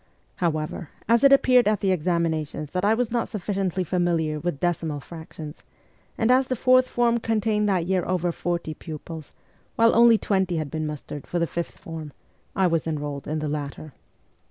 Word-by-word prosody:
However, 155 -1 -2 0.2
as 230 +2 +4
it 275 - +7
appeared 255 -4 +5
at 210 -2 +2
the 195 - +1
examinations 160 -4 -1
that 180 +1 -2
I 210 +2 +4
was 240 -1 -1
not 235 -1 0
sufficiently 190 -3 -2
familiar 170 -3 0
with 155 -2 -3
decimal 165 -4 -1
fractions, 160 0 -9 0.6
and 225 +2 +2
as 260 +1 +4
the 255 - -1
fourth 255 +1 +4
form 235 -1 +2
contained 215 -2 +1
that 180 -4 +1
year 185 0 +1
over 180 -1 0
forty 170 -2 -3
pupils, 155 0 -8 0.4
while 230 0 +4
only 235 -1 +7
twenty 190 -5 0
had 155 -3 -3
been 155 -1 -2
mustered 150 -1 -7
for 175 - -2
the 170 - +2
fifth 170 +1 -5
form, 160 -3 -8 0.4
I 190 - +3
was 165 -2 +1
enrolled 145 -3 -4
in 155 - -2
the 155 0 -2
latter. 145 0 -5
175 Hz, 180 wpm, -25 LUFS, 155-210 Hz, 0.6 s, it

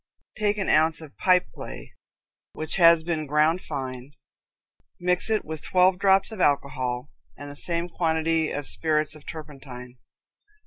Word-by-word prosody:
Take 210 -1 0
an 195 - -2
ounce 160 +1 +3
of 155 -3 -12
pipe 180 -1 +3
clay, - - -9 0.6
which 155 +3 -3
has 170 -2 +6
been 160 -3 -2
ground 155 +5 +2
fine, 130 +1 -6 0.9
mix 180 +3 +2
it 220 -1 0
with 160 0 -6
twelve 180 0 +3
drops 195 +1 +3
of 215 -4 -5
alcohol 130 -3 0 0.3
and 145 0 -8
the - - -10
same 170 +3 -2
quantity 160 -2 0
of 145 0 -4
spirits 155 0 0
of 155 -2 -15
turpentine. 135 -5 -10
160 Hz, 145 wpm, -25 LUFS, 145-180 Hz, 0.9 s, has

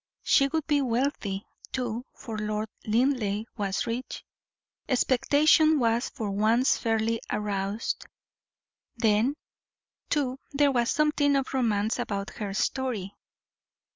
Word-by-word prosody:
She 275 - +4
would 315 +1 -2
be 295 -2 +2
wealthy, 235 -6 -1 0.3
too, 245 -1 -3
for 225 -3 -7
Lord 215 0 -2 0.2
Linleigh 220 -3 +1
was 200 -4 -1
rich. 240 +2 -5 0.6
Expectation 295 +5 +4
was 235 -2 +1
for 210 -3 -4
once 220 +6 +3
fairly 225 0 0
aroused; 205 +1 -2 0.9
then, 225 +5 +2 0.7
too, 270 -3 0
there 285 0 +4
was 240 -2 +1
something 300 -2 +2
of 270 -1 -1
romance 225 -3 +1
about 200 -4 -3
her 200 -2 -5
story. 220 -5 -1
235 Hz, 110 wpm, -27 LUFS, 210-270 Hz, 0.9 s, She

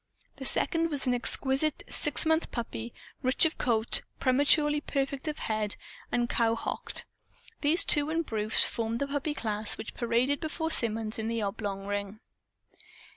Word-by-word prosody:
The - - -7
second 330 -1 +1
was 285 -3 +2
an 250 - +1
exquisite 265 +4 +2
six 295 - +2
months 320 +1 +1
puppy, 235 -1 -6 0.3
rich 260 +4 +2
of 320 - -2
coat, 225 -2 +1 0.2
prematurely 295 +3 +2
perfect 275 0 -3
of 305 0 -3
head, 215 -2 -1 0.4
and 240 0 0
cowhocked. 230 -1 -1 0.6
These 325 +6 +5
two 295 -5 +4
and 330 +1 -1
Bruce 215 -2 +4
formed 230 0 -3
the 280 - -2
puppy 285 +1 -3
class 215 -3 +1
which - - -8
paraded 240 +4 0
before 320 +1 -4
Symonds 225 -5 +2
in 220 - -3
the 230 -1 -2
oblong 200 -1 -4
ring. 205 +1 -5
250 Hz, 150 wpm, -28 LUFS, 220-295 Hz, 0.6 s, These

